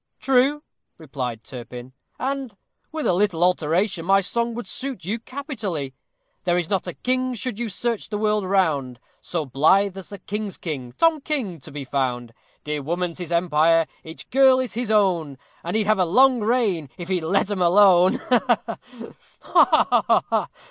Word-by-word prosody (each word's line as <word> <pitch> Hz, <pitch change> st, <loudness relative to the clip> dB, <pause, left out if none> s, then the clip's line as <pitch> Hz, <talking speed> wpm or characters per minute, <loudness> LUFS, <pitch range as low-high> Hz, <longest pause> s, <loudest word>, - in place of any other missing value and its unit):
"True," 270 Hz, +3 st, +2 dB, 0.3 s
replied 130 Hz, -7 st, -5 dB
Turpin, 125 Hz, 0 st, -9 dB, 0.2 s
"and, 265 Hz, -5 st, -4 dB, 0.3 s
with 315 Hz, -1 st, -4 dB
a -, -, +3 dB
little 180 Hz, -2 st, +1 dB
alteration, 180 Hz, +1 st, +1 dB
my 195 Hz, +3 st, +4 dB
song 235 Hz, +4 st, -1 dB
would 240 Hz, -, -5 dB
suit 255 Hz, -9 st, -5 dB
you 215 Hz, +5 st, -2 dB
capitally: 220 Hz, -, -5 dB, 0.5 s
There 175 Hz, -1 st, +1 dB
is 175 Hz, 0 st, -2 dB
not 190 Hz, -2 st, 0 dB
a 180 Hz, -, -5 dB
king, 255 Hz, 0 st, -1 dB
should 235 Hz, -1 st, -5 dB
you 240 Hz, -2 st, -2 dB
search 230 Hz, +3 st, -3 dB
the 210 Hz, -, -3 dB
world 210 Hz, -1 st, +1 dB
round, 155 Hz, -10 st, 0 dB, 0.2 s
So 165 Hz, -4 st, -3 dB
blithe 180 Hz, +9 st, +3 dB
as 190 Hz, -2 st, -9 dB
the 200 Hz, -, -8 dB
king's 205 Hz, +1 st, -5 dB
king, 130 Hz, -7 st, -6 dB
TOM 330 Hz, -2 st, +2 dB
KING, 245 Hz, -, -3 dB
to 130 Hz, -, -11 dB
be 140 Hz, -1 st, -6 dB
found; 125 Hz, -3 st, -2 dB, 0.3 s
Dear 150 Hz, 0 st, -3 dB
woman's 170 Hz, +4 st, -3 dB
his 175 Hz, -2 st, -6 dB
empire, 165 Hz, -1 st, +3 dB, 0.2 s
each 160 Hz, 0 st, -9 dB
girl 265 Hz, 0 st, +5 dB
is 255 Hz, -1 st, -3 dB
his 235 Hz, 0 st, -3 dB
own, 180 Hz, -10 st, +1 dB, 0.3 s
And 175 Hz, +5 st, -3 dB
he'd 220 Hz, -1 st, +1 dB
have 215 Hz, -1 st, +2 dB
a 185 Hz, -, +3 dB
long 255 Hz, +8 st, +4 dB
reign 210 Hz, -, 0 dB
if 175 Hz, -, -7 dB
he'd 185 Hz, -2 st, 0 dB
let 195 Hz, +5 st, +1 dB
'em 195 Hz, -3 st, -2 dB
alone. 185 Hz, 0 st, +5 dB
Ha, 240 Hz, -2 st, 0 dB, 0.7 s
ha!" -, -, +4 dB
"Ha, -, -, +2 dB
ha!" -, -, 0 dB
190 Hz, 175 wpm, -23 LUFS, 160-235 Hz, 0.7 s, girl